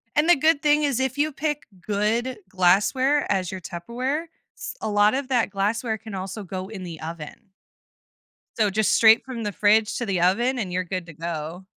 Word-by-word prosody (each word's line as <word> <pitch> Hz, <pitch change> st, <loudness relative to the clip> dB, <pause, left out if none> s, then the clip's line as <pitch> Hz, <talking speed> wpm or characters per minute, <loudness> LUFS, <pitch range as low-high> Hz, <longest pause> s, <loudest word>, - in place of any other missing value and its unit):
And, 305 Hz, +4 st, +3 dB
the 350 Hz, -, +8 dB
good 310 Hz, +1 st, +2 dB
thing 300 Hz, 0 st, +3 dB
is, 280 Hz, -4 st, +1 dB
if 265 Hz, +1 st, -1 dB
you 300 Hz, +1 st, +1 dB
pick 295 Hz, +1 st, -3 dB, 0.2 s
good 215 Hz, +6 st, -1 dB
glassware 210 Hz, +11 st, +2 dB
as 185 Hz, -2 st, 0 dB
your 190 Hz, -, -6 dB
Tupperware, 250 Hz, -, -3 dB, 0.3 s
s -, -, -6 dB
a -, -, -2 dB
lot 205 Hz, +1 st, +4 dB
of 270 Hz, 0 st, -2 dB
that 245 Hz, -5 st, +2 dB
glassware 220 Hz, +3 st, -1 dB
can 220 Hz, 0 st, -10 dB
also 190 Hz, +3 st, -5 dB
go 185 Hz, 0 st, -6 dB
in 205 Hz, -4 st, -7 dB
the 170 Hz, -3 st, -7 dB
oven. 165 Hz, +5 st, -8 dB, 1.1 s
So, 215 Hz, -2 st, +3 dB
just 215 Hz, +2 st, +1 dB
straight 225 Hz, 0 st, +6 dB
from 245 Hz, -4 st, -5 dB
the 205 Hz, -, -2 dB
fridge 215 Hz, +1 st, +3 dB
to 240 Hz, -, -2 dB
the 195 Hz, -4 st, -1 dB
oven, 240 Hz, +8 st, +2 dB
and 185 Hz, -4 st, -3 dB
you're 185 Hz, -, 0 dB
good 185 Hz, 0 st, -4 dB
to 165 Hz, -, -11 dB
go. 165 Hz, +3 st, -5 dB
215 Hz, 200 wpm, -24 LUFS, 185-260 Hz, 1.1 s, the